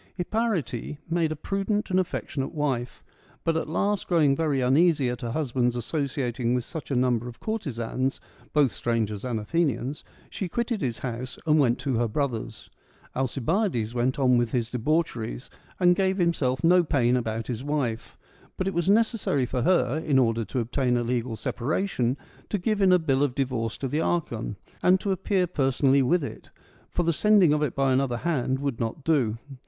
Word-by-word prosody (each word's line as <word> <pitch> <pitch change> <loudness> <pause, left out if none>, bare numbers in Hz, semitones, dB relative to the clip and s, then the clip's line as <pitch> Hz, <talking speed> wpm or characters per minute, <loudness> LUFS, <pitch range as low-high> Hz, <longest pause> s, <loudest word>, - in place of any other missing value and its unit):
Hipparete 175 - -2
made 165 -2 +1
a - - -2
prudent 195 +6 -2
and 185 - +3
affectionate 160 -5 -3
wife; 130 -5 -2 0.2
— - - -30
but 165 - +2
at 160 - -2
last 200 +5 0
growing 155 -6 +3
very 150 -3 0
uneasy 140 +1 +3
at 125 - -6
her 120 - -3
husband's 125 -3 0
associating 125 -2 -1
with 125 - -1
such 155 0 -7
a 135 - 0
number 125 -1 +1
of 120 - -9
courtesans, 135 - -2 0.3
both 145 -5 +3
strangers 110 -3 -2
and 120 -3 -2
Athenians, 140 +1 -1 0.2
she 190 - -5
quitted 235 +1 -1
his 120 -4 -1
house 125 0 -5
and 155 -1 +4
went 125 -4 +3
to 135 -5 0
her 120 0 +1
brother's. 115 -3 -3 0.4
Alcibiades 135 - 0
went 125 +2 0
on 125 -3 +4
with 120 -2 -1
his 120 -1 -1
debauch 155 +7 0
eries, 115 +2 -6 0.3
and 180 -1 +5
gave 190 0 +1
himself 145 -8 +1
no 175 +2 +6
pain 125 -6 +2
about 115 -2 -2
his 120 0 -4
wife; 140 -6 -2 0.4
but 185 - -1
it 195 - -1
was 170 +2 0
necessary 215 - +2
for 125 0 -2
her, 155 -1 +2
in 150 -4 +1
order 115 -3 +2
to 110 +5 -6
obtain 125 +1 0
a 120 - 0
legal 120 -1 -1
separation, 130 - -1 0.3
to 205 - 0
give 205 +2 0
in 190 -1 +5
a 180 - +7
bill 140 -5 +1
of 140 -3 +1
divorce 125 -5 -1
to 135 - -3
the 150 +5 -1
archon, 120 -12 -1 0.3
and 185 +1 +4
to 200 - -2
appear 190 0 +1
per 145 -6 0
sonally 135 +1 +3
with 165 +6 +2
it; - - -8 0.4
for 175 - -1
the 170 0 +2
sending 200 -3 +5
of 150 - +1
it 150 -4 -1
by 135 -1 +2
another 130 -2 +1
hand 135 -3 0
would 140 -4 -3
not 115 +5 -3
do. 130 -9 +2
135 Hz, 190 wpm, -26 LUFS, 120-170 Hz, 0.4 s, a